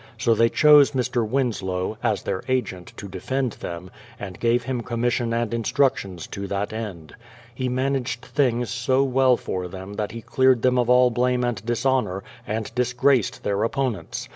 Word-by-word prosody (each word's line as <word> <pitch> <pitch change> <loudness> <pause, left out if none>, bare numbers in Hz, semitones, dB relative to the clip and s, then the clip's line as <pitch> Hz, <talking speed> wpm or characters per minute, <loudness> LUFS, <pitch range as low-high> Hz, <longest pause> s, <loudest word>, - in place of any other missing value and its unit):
So 115 +1 +2
they 115 +1 +3
chose 150 0 +6
Mr. 125 -2 0
Winslow, 105 -7 -1
as - - 0
their 95 - -2
agent, 125 -9 -2
to 100 - -7
defend 125 +7 -2
them, 90 -1 -7 0.3
and 95 -3 -7
gave 120 +1 +2
him 125 0 -2
commission 120 0 -1
and 115 0 -1
instructions 115 - 0
to 100 0 -5
that 100 +2 -3
end. 100 -8 -6 0.4
He 125 +1 -2
managed 130 -1 -1
things 120 -4 0
so 130 +3 +1
well 130 -1 +3
for 90 -1 -4
them 95 +2 -8
that 105 0 -3
he 115 -1 -8
cleared 130 +1 +3
them 125 0 +3
of 120 -1 +1
all 125 0 +5
blame 125 +1 +1
and 120 -4 -2
dishonour, 120 -5 0 0.2
and 110 0 -3
disgraced 125 0 +1
their 100 0 0
opponents. 115 - -2
120 Hz, 165 wpm, -23 LUFS, 105-130 Hz, 0.4 s, chose